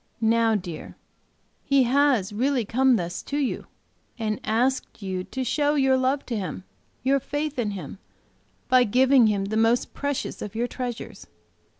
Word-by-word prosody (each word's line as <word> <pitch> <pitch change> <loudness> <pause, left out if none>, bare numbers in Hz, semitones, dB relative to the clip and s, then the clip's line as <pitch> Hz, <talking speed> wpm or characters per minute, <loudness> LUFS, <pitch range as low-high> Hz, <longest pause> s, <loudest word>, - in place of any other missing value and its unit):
Now, 225 0 +3
dear, 180 -5 -6 0.7
he 275 -1 +3
has 250 -6 +2
really 250 +2 +1
come 260 +4 +3
thus 175 -3 -3
to 285 - -4
you, 275 -4 -2 0.5
and 215 -2 -2
asked 235 0 -1
you 185 -1 -3
to 260 - -4
show 290 +3 +1
your 270 -2 +3
love 260 +2 0
to 235 - -3
Him, 185 -3 -4 0.4
your 275 +2 +3
faith 290 +1 -3
in 220 -4 0
Him, 190 -3 -7 0.7
by 255 -1 +5
giving 255 +2 +4
Him 200 -2 0
the 215 +2 -2
most 225 +2 +2
precious 285 -1 -3
of 210 0 -6
your 235 +2 0
treasures. 245 -1 -6
245 Hz, 160 wpm, -25 LUFS, 210-265 Hz, 0.7 s, by